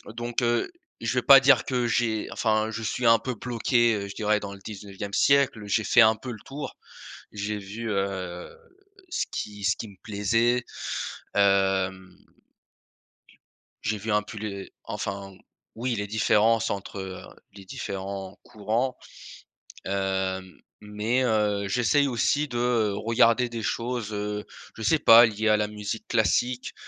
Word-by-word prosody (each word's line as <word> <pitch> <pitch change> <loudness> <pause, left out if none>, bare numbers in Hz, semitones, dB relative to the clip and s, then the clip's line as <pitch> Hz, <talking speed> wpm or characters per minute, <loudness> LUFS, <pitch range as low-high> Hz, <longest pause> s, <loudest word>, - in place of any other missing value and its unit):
donc, 120 +1 -2
heu, 120 - +1 0.3
je 115 0 -1
vais 125 - +2
pas 135 +2 +8
dire 135 0 +5
que 125 -2 0
j'ai 115 -2 0
enfin, 110 -1 0
je 115 +1 -5
suis 120 +2 -2
un 115 0 +6
peu 125 +3 -4
bloqué, 120 0 +1
heu, 100 -1 -4
je 100 - -9
dirais 105 0 +1
dans 100 -1 -7
le 100 - -12
19e 100 -1 -8
siècle. 140 -5 +3
J'ai 105 +2 +1
fait 115 - +3
un 110 -1 +7
peu 125 +2 -7
le 110 - -8
tour. 145 +2 -7 0.6
J'ai 105 0 -3
vu, 105 +4 -6
heu, 95 -3 -3 0.6
ce - - -1
qui 105 -1 -6
ce 90 - +2
qui - - -6
me 100 - -15
plaisait, 115 +4 +1 0.7
hem 95 -1 +1 1.6
j'ai 105 0 -1
vu 110 +3 -3
un 105 0 +2
pu 105 +1 -9
les 100 -2 -6
enfin, 100 -1 -5 0.4
oui, 120 +2 -2
les 105 -1 -3
différences, 110 +1 +2
entre, 100 0 -5
heu, 95 -1 -6 0.3
les 100 -1 -13
différents 95 0 -6
courants. 110 +5 -2 0.9
Hem, 95 -1 -2 0.2
mais 105 +4 -1
heu, 105 -4 +1
j'essaye 125 +6 +2
aussi 145 +4 +1
de, 120 - -4
heu, 120 -4 +1
regarder 115 +3 +3
des 115 -2 -5
choses, 115 -1 -2
heu, 105 0 -3 0.3
je - - -9
sais 155 +8 +3
pas, 115 -2 +9
liées 110 -1 -1
à 105 - +5
la 105 0 0
musique 105 +1 -5
classique, 120 +3 +1
110 Hz, 155 wpm, -26 LUFS, 100-120 Hz, 1.6 s, pas